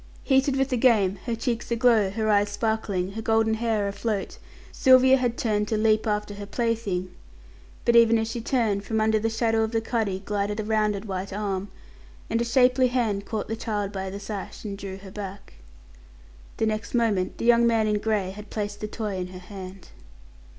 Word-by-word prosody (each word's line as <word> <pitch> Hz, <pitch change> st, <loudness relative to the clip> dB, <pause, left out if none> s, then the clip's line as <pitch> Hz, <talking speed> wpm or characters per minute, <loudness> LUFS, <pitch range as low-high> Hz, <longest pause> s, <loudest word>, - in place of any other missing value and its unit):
Heated 270 Hz, 0 st, +2 dB
with 270 Hz, 0 st, +1 dB
the 255 Hz, -, 0 dB
game, 205 Hz, -6 st, +3 dB
her 235 Hz, -, 0 dB
cheeks 230 Hz, 0 st, -3 dB
aglow, 230 Hz, -4 st, +3 dB
her 220 Hz, +2 st, -2 dB
eyes 205 Hz, -1 st, +3 dB
sparkling, 205 Hz, -3 st, -1 dB
her 220 Hz, +3 st, -5 dB
golden 220 Hz, 0 st, +2 dB
hair 220 Hz, -2 st, 0 dB
afloat, 200 Hz, 0 st, -3 dB, 0.3 s
Sylvia 260 Hz, 0 st, +6 dB
had 245 Hz, -2 st, -1 dB
turned 210 Hz, -2 st, 0 dB
to 220 Hz, -, 0 dB
leap 215 Hz, +1 st, +2 dB
after 210 Hz, -1 st, -1 dB
her 205 Hz, 0 st, -8 dB
plaything, 205 Hz, -5 st, -2 dB, 0.7 s
but 235 Hz, -, +3 dB
even 230 Hz, -1 st, +6 dB
as 225 Hz, 0 st, -1 dB
she 230 Hz, +1 st, -4 dB
turned, 220 Hz, -5 st, 0 dB
from 220 Hz, +2 st, -1 dB
under 220 Hz, 0 st, +2 dB
the 225 Hz, +1 st, 0 dB
shadow 225 Hz, 0 st, +1 dB
of 220 Hz, +1 st, -1 dB
the 225 Hz, -, +2 dB
cuddy 220 Hz, -4 st, -1 dB
glided 205 Hz, +1 st, -2 dB
a -, -, -1 dB
rounded 215 Hz, -1 st, 0 dB
white 190 Hz, -1 st, -4 dB
arm; 200 Hz, -1 st, -3 dB, 0.6 s
and 230 Hz, -, +1 dB
a -, -, +2 dB
shapely 255 Hz, +1 st, +4 dB
hand 225 Hz, -5 st, -1 dB
caught 220 Hz, -, -3 dB
the 225 Hz, -, -2 dB
child 210 Hz, -3 st, -3 dB
by 190 Hz, -1 st, -4 dB
the 200 Hz, +1 st, -6 dB
sash 200 Hz, -1 st, -7 dB
and 200 Hz, -2 st, -6 dB
drew 190 Hz, -1 st, -6 dB
her 195 Hz, 0 st, -12 dB
back. 200 Hz, -1 st, -8 dB, 1.0 s
The 220 Hz, -, +1 dB
next 215 Hz, +2 st, -2 dB
moment 215 Hz, -6 st, +1 dB
the -, -, -4 dB
young 235 Hz, 0 st, +5 dB
man 225 Hz, -2 st, +2 dB
in 210 Hz, -1 st, +1 dB
grey 205 Hz, -4 st, -1 dB
had 210 Hz, +1 st, -10 dB
placed 205 Hz, -1 st, -4 dB
the 215 Hz, -, -2 dB
toy 210 Hz, -3 st, -4 dB
in 180 Hz, -1 st, -3 dB
her 185 Hz, 0 st, -10 dB
hand. 185 Hz, 0 st, -10 dB
215 Hz, 200 wpm, -25 LUFS, 200-230 Hz, 1.0 s, Sylvia